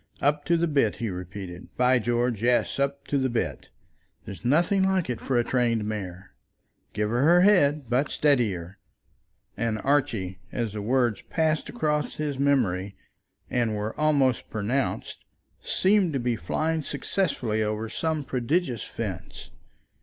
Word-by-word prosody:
"Up 145 Hz, +1 st, +1 dB
to 170 Hz, -, +3 dB
the 170 Hz, +1 st, +1 dB
bit," 140 Hz, -8 st, +2 dB
he 115 Hz, -4 st, -3 dB
repeated; 90 Hz, 0 st, -7 dB
"by 125 Hz, 0 st, +4 dB
George, 120 Hz, -1 st, 0 dB
yes; 120 Hz, +3 st, +2 dB
up 140 Hz, 0 st, -1 dB
to 140 Hz, -, +2 dB
the 130 Hz, 0 st, +1 dB
bit. 120 Hz, -1 st, -3 dB, 0.6 s
There's 100 Hz, -, -9 dB
nothing 170 Hz, -, +3 dB
like 190 Hz, -7 st, +1 dB
it 120 Hz, -, -5 dB
for 130 Hz, -, 0 dB
a 120 Hz, -, +3 dB
trained 115 Hz, -3 st, +1 dB
mare. 95 Hz, -3 st, -5 dB, 0.6 s
Give 105 Hz, 0 st, -1 dB
her 155 Hz, +9 st, +5 dB
head, 150 Hz, -8 st, +4 dB
but 125 Hz, +5 st, +1 dB
steady 135 Hz, -8 st, +2 dB
her." 90 Hz, +2 st, -8 dB, 0.8 s
And 115 Hz, 0 st, -1 dB
Archie, 115 Hz, -10 st, 0 dB
as 115 Hz, -4 st, -2 dB
the 105 Hz, -, -4 dB
words 120 Hz, -1 st, +1 dB
passed 160 Hz, -1 st, 0 dB
across 150 Hz, -10 st, -1 dB
his 145 Hz, -3 st, -3 dB
memory 100 Hz, -9 st, +1 dB, 0.5 s
and 115 Hz, -3 st, 0 dB
were 105 Hz, +1 st, -3 dB
almost 140 Hz, -5 st, +2 dB
pronounced, 115 Hz, +6 st, -2 dB, 0.4 s
seemed 190 Hz, -3 st, +2 dB
to 135 Hz, -, 0 dB
be 120 Hz, -1 st, 0 dB
flying 160 Hz, +7 st, -1 dB
successfully 140 Hz, -, -1 dB
over 110 Hz, +1 st, -1 dB
some 155 Hz, +6 st, -2 dB
prodigious 130 Hz, -, -1 dB
fence. 95 Hz, -4 st, -6 dB
125 Hz, 145 wpm, -26 LUFS, 110-150 Hz, 0.8 s, her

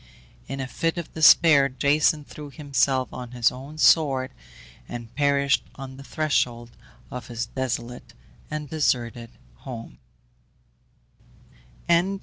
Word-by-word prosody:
In 135 Hz, -, -5 dB
a 130 Hz, -, -2 dB
fit 165 Hz, +6 st, -2 dB
of 170 Hz, -, -6 dB
despair 155 Hz, -3 st, +6 dB
Jason 145 Hz, +3 st, +2 dB
threw 150 Hz, 0 st, -10 dB
himself 135 Hz, -2 st, 0 dB
on 125 Hz, -1 st, -7 dB
his 120 Hz, -2 st, +3 dB
own 135 Hz, +5 st, -10 dB
sword, 140 Hz, -5 st, +4 dB, 0.6 s
and 120 Hz, -1 st, -7 dB
perished 140 Hz, -1 st, +2 dB
on 130 Hz, -1 st, -9 dB
the 135 Hz, -, -10 dB
threshold 125 Hz, -6 st, -1 dB, 0.4 s
of 125 Hz, -1 st, -7 dB
his 120 Hz, -1 st, -3 dB
desolate 125 Hz, 0 st, -5 dB, 0.3 s
and 150 Hz, -1 st, -4 dB
deserted 120 Hz, -6 st, -1 dB, 0.3 s
home. 115 Hz, -, -9 dB
135 Hz, 115 wpm, -25 LUFS, 125-150 Hz, 0.6 s, despair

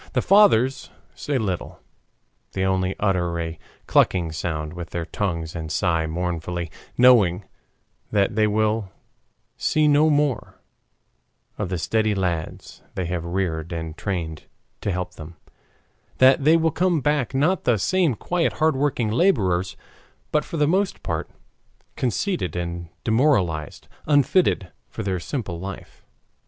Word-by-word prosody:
The -, -, +1 dB
fathers 185 Hz, -, +4 dB, 0.2 s
say 145 Hz, -2 st, -2 dB
little. 95 Hz, -7 st, -3 dB, 0.7 s
They 95 Hz, 0 st, 0 dB
only 95 Hz, 0 st, 0 dB
utter 90 Hz, -4 st, 0 dB
a 80 Hz, -1 st, -4 dB, 0.3 s
clucking 85 Hz, -4 st, +2 dB
sound 80 Hz, -1 st, -3 dB
with 85 Hz, -2 st, -7 dB
their 85 Hz, -1 st, -4 dB
tongues 85 Hz, -2 st, -3 dB
and 80 Hz, -2 st, -5 dB
sigh 80 Hz, -1 st, +1 dB
mournfully, 85 Hz, 0 st, -3 dB, 0.3 s
knowing 105 Hz, -7 st, +5 dB, 0.6 s
that 100 Hz, 0 st, +1 dB
they 110 Hz, -1 st, +3 dB
will 110 Hz, -1 st, 0 dB, 0.7 s
see 155 Hz, -1 st, +2 dB
no 150 Hz, +2 st, +5 dB
more 145 Hz, -5 st, 0 dB, 1.0 s
of -, -, -2 dB
the 90 Hz, -, -2 dB
steady 110 Hz, +4 st, +1 dB
lads 85 Hz, -4 st, -3 dB
they 95 Hz, -, -2 dB
have 85 Hz, -1 st, -3 dB
reared 85 Hz, -2 st, -2 dB
and 80 Hz, -2 st, -5 dB
trained 85 Hz, -5 st, -4 dB, 0.4 s
to 100 Hz, -, -1 dB
help 90 Hz, 0 st, -3 dB
them, 80 Hz, 0 st, -10 dB, 0.8 s
that 130 Hz, +1 st, +5 dB
they 160 Hz, +2 st, +6 dB
will 160 Hz, 0 st, +2 dB
come 175 Hz, -1 st, +1 dB
back 145 Hz, -2 st, 0 dB
not 160 Hz, +7 st, +1 dB
the 120 Hz, -3 st, +3 dB
same 170 Hz, -, +1 dB
quiet 170 Hz, +9 st, -1 dB
hard 155 Hz, -1 st, +2 dB
working 130 Hz, -5 st, 0 dB
laborers, 95 Hz, -, +1 dB, 0.5 s
but 150 Hz, -, +2 dB
for 165 Hz, -, -6 dB
the 150 Hz, -1 st, +3 dB
most 190 Hz, +3 st, 0 dB
part -, -, -3 dB, 0.7 s
conceited 130 Hz, -, -1 dB
and 85 Hz, -1 st, -4 dB
demoralized, 105 Hz, -, +1 dB, 0.2 s
unfitted 145 Hz, -, +2 dB, 0.2 s
for 110 Hz, -, -6 dB
their 95 Hz, -2 st, -1 dB
simple 95 Hz, -, -4 dB
life. 95 Hz, +2 st, -9 dB
95 Hz, 135 wpm, -23 LUFS, 85-140 Hz, 1.0 s, they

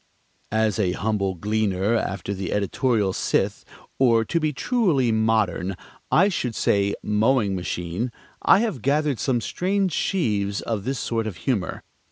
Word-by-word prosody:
As 110 Hz, -1 st, +1 dB
a 90 Hz, -4 st, +1 dB
humble 100 Hz, -1 st, -1 dB
gleaner 105 Hz, +1 st, 0 dB
after 100 Hz, -2 st, -2 dB
the 95 Hz, -2 st, -4 dB
editorial 105 Hz, 0 st, +1 dB
scythe, -, -, 0 dB, 0.4 s
or, 115 Hz, -4 st, +4 dB
to 170 Hz, -, 0 dB
be 155 Hz, -1 st, 0 dB
truly 150 Hz, -, +1 dB
modern, 110 Hz, -4 st, +1 dB, 0.4 s
I 190 Hz, -, +5 dB
should 125 Hz, -, -2 dB
say 100 Hz, 0 st, +1 dB
mowing 105 Hz, -1 st, +2 dB
machine, 90 Hz, +5 st, -3 dB, 0.3 s
I 200 Hz, -, +5 dB
have 215 Hz, -, -2 dB
gathered 145 Hz, -1 st, +1 dB
some 120 Hz, +1 st, 0 dB
strange 190 Hz, -, 0 dB
sheaves 105 Hz, -, 0 dB
of 110 Hz, -3 st, -3 dB
this 135 Hz, 0 st, -1 dB
sort 115 Hz, -2 st, -2 dB
of 100 Hz, -, -6 dB
humor. 115 Hz, -9 st, -1 dB
110 Hz, 145 wpm, -24 LUFS, 100-135 Hz, 0.4 s, I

